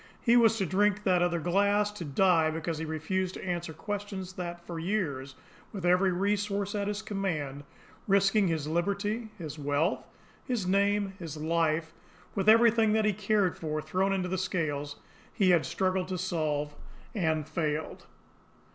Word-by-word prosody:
He 235 Hz, 0 st, +3 dB
was 225 Hz, -2 st, +5 dB
to 195 Hz, -, 0 dB
drink 205 Hz, +3 st, +1 dB
that 180 Hz, -3 st, +3 dB
other 175 Hz, -1 st, +1 dB
glass, 200 Hz, +5 st, +2 dB
to 210 Hz, -4 st, -7 dB
die 165 Hz, +2 st, +3 dB
because 160 Hz, 0 st, -3 dB
he 160 Hz, -, -3 dB
refused 180 Hz, +4 st, -2 dB
to -, -, -7 dB
answer 175 Hz, -2 st, -3 dB
questions 200 Hz, 0 st, -5 dB
that 175 Hz, -1 st, -6 dB
for 170 Hz, -2 st, -5 dB
years, 150 Hz, -8 st, -2 dB, 0.4 s
with 190 Hz, -4 st, -5 dB
every 180 Hz, +2 st, +4 dB
resource 200 Hz, +1 st, -1 dB
at 200 Hz, -1 st, -1 dB
his 210 Hz, +1 st, -3 dB
command, 165 Hz, -10 st, -3 dB, 0.4 s
risking 195 Hz, +1 st, +4 dB
his 160 Hz, -3 st, -1 dB
liberty, 200 Hz, +7 st, -1 dB
his 155 Hz, -3 st, -7 dB
wealth, 145 Hz, +5 st, 0 dB, 0.4 s
his 240 Hz, -7 st, -2 dB
name, 200 Hz, +1 st, +2 dB
his 160 Hz, -3 st, -6 dB
life, 160 Hz, 0 st, 0 dB, 0.4 s
with 200 Hz, +1 st, +2 dB
everything 225 Hz, -1 st, +5 dB
that 220 Hz, -1 st, +2 dB
he 210 Hz, -, +3 dB
cared 200 Hz, -2 st, +1 dB
for 155 Hz, -1 st, -3 dB
thrown 190 Hz, +5 st, 0 dB
into 190 Hz, -2 st, 0 dB
the 185 Hz, 0 st, -2 dB
scales, 145 Hz, -6 st, -2 dB, 0.4 s
he 190 Hz, -3 st, +3 dB
had 170 Hz, -3 st, +3 dB
struggled 185 Hz, -1 st, 0 dB
to 185 Hz, -1 st, -3 dB
solve 155 Hz, -5 st, -1 dB, 0.4 s
and 160 Hz, -7 st, 0 dB
failed! 155 Hz, -1 st, -3 dB
185 Hz, 160 wpm, -29 LUFS, 160-205 Hz, 0.4 s, was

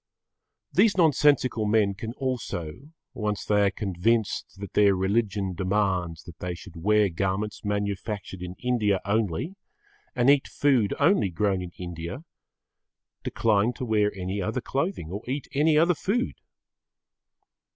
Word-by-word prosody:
These 215 Hz, -4 st, +4 dB
nonsensical 145 Hz, -, +3 dB
men 105 Hz, -2 st, +3 dB
can 110 Hz, +4 st, -6 dB
also, 125 Hz, -, -4 dB, 0.2 s
once 105 Hz, -2 st, -2 dB
they 105 Hz, -1 st, +3 dB
are -, -, +4 dB
convinced 100 Hz, +3 st, -1 dB
that 100 Hz, -, -7 dB
their 100 Hz, -2 st, +5 dB
religion 95 Hz, 0 st, 0 dB
demands 90 Hz, -3 st, -1 dB
that 85 Hz, -3 st, -12 dB
they 90 Hz, -1 st, -3 dB
should 85 Hz, +1 st, -12 dB
wear 105 Hz, +5 st, +3 dB
garments 95 Hz, +4 st, -2 dB
manufactured 100 Hz, -2 st, -3 dB
in 90 Hz, 0 st, -6 dB
India 110 Hz, -6 st, +1 dB
only 105 Hz, -, 0 dB, 0.6 s
and 125 Hz, 0 st, +2 dB
eat 140 Hz, -1 st, +5 dB
food 130 Hz, -8 st, +2 dB
only 145 Hz, -, +3 dB
grown 95 Hz, +1 st, 0 dB
in 90 Hz, -, -6 dB
India, 85 Hz, -, -6 dB, 1.0 s
decline 110 Hz, +1 st, +1 dB
to 130 Hz, -, -5 dB
wear 105 Hz, -2 st, +2 dB
any 95 Hz, +1 st, -3 dB
other 110 Hz, +6 st, -1 dB
clothing 135 Hz, -, -3 dB
or 100 Hz, +3 st, -4 dB
eat 140 Hz, +2 st, -3 dB
any 150 Hz, +2 st, +3 dB
other 170 Hz, +3 st, +5 dB
food. 225 Hz, -, -1 dB
105 Hz, 135 wpm, -26 LUFS, 95-125 Hz, 1.0 s, their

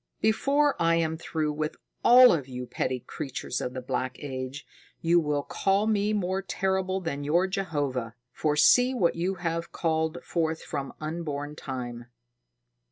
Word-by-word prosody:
Before 275 Hz, +6 st, +2 dB
I 165 Hz, 0 st, +4 dB
am 160 Hz, -1 st, 0 dB
through 155 Hz, -2 st, -2 dB
with 155 Hz, +1 st, -3 dB, 0.3 s
all 250 Hz, +1 st, +9 dB
of 145 Hz, -6 st, -2 dB
you 125 Hz, -1 st, -6 dB
petty 125 Hz, 0 st, -2 dB
creatures 125 Hz, -1 st, -4 dB
of 125 Hz, -, -4 dB
the 130 Hz, -, -5 dB
Black 130 Hz, 0 st, -2 dB
Age, 130 Hz, 0 st, -6 dB, 0.3 s
you 170 Hz, +1 st, +4 dB
will 150 Hz, -3 st, 0 dB
call 195 Hz, +6 st, +1 dB
me 210 Hz, -1 st, +1 dB
more 190 Hz, -2 st, 0 dB
terrible 190 Hz, 0 st, -1 dB
than 155 Hz, -6 st, -4 dB
your 170 Hz, +6 st, +3 dB
Jehovah! 145 Hz, -, -2 dB, 0.2 s
For 150 Hz, -1 st, 0 dB
see 250 Hz, -, +5 dB
what 180 Hz, -8 st, +2 dB
you 180 Hz, +3 st, -1 dB
have 170 Hz, -2 st, -3 dB
called 160 Hz, 0 st, 0 dB
forth 160 Hz, -1 st, -1 dB
from 140 Hz, -3 st, -5 dB
unborn 150 Hz, -2 st, -4 dB
time." 120 Hz, -4 st, -6 dB
160 Hz, 155 wpm, -27 LUFS, 140-190 Hz, 0.3 s, all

